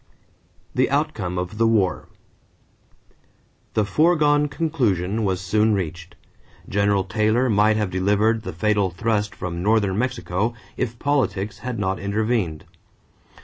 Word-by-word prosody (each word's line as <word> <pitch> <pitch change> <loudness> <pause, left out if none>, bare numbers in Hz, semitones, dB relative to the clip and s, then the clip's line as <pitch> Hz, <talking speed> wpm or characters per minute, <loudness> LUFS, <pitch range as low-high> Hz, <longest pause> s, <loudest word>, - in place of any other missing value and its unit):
=The 130 - +2
Outcome 135 - -1
of 90 +4 -4
the 115 - +4
War.= 105 -5 +1 1.7
The 105 - +2
foregone 150 - +3
conclusion 115 - -1
was 95 -3 0
soon 105 +3 +2
reached. 85 -1 -5 0.5
General 100 -1 +1
Taylor 110 +6 +1
might 105 +1 +3
have 105 -4 -1
delivered 105 +4 +2
the 95 - -6
fatal 100 +3 +1
thrust 105 +3 -1
from 85 -1 -5
northern 105 -1 +2
Mexico 115 -3 -1 0.2
if 120 -1 -3
politics 105 -8 -1
had 125 -1 -4
not 95 -2 -1
intervened. 100 -5 -1
105 Hz, 120 wpm, -22 LUFS, 95-115 Hz, 1.7 s, the